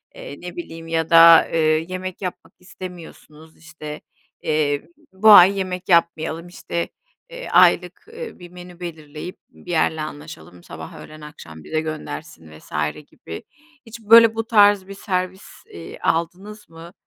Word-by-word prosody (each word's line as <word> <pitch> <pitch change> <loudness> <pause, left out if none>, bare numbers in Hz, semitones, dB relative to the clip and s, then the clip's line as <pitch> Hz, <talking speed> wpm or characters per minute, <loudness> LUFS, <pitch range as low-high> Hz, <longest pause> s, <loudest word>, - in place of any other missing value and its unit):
eee, - - -10
ne 175 0 -8
bileyim 165 -1 -9
ya 165 -1 -1
da, 165 0 +8
eee, 165 - -1 0.3
yemek 185 0 -6
yapmak 180 -2 -7
istemiyorsunuz, 170 -4 -12
işte, 155 -2 -10 0.4
eee, 150 -1 -1 0.3
bu 205 +3 +4
ay 195 0 +8
yemek 185 -1 -4
yapmayalım, 170 -1 +1
işte, 170 -1 -5 0.4
eee, - - -9
aylık, - - +3
eee, 475 0 -9
bir 175 -1 -12
menü 180 0 -13
belirleyip 160 -1 -8
bir 180 - -12
yerle 160 -1 0
anlaşalım; 150 - -10
sabah, - - -10
öğlen, 155 0 -13
akşam 80 - -12
bize 155 0 -2
göndersin 155 - -8
vs. - - -20 0.4
gibi. 80 - -10 0.4
Hiç, 230 +1 -11
böyle, 225 +1 +7
bu 225 - -2
tarz 205 -4 +4
bir 200 - -8
servis, 185 -1 -4 0.2
eee, 85 -1 -11
aldınız 190 +6 -3
mı? 165 +1 -13
170 Hz, 145 wpm, -21 LUFS, 155-190 Hz, 0.4 s, da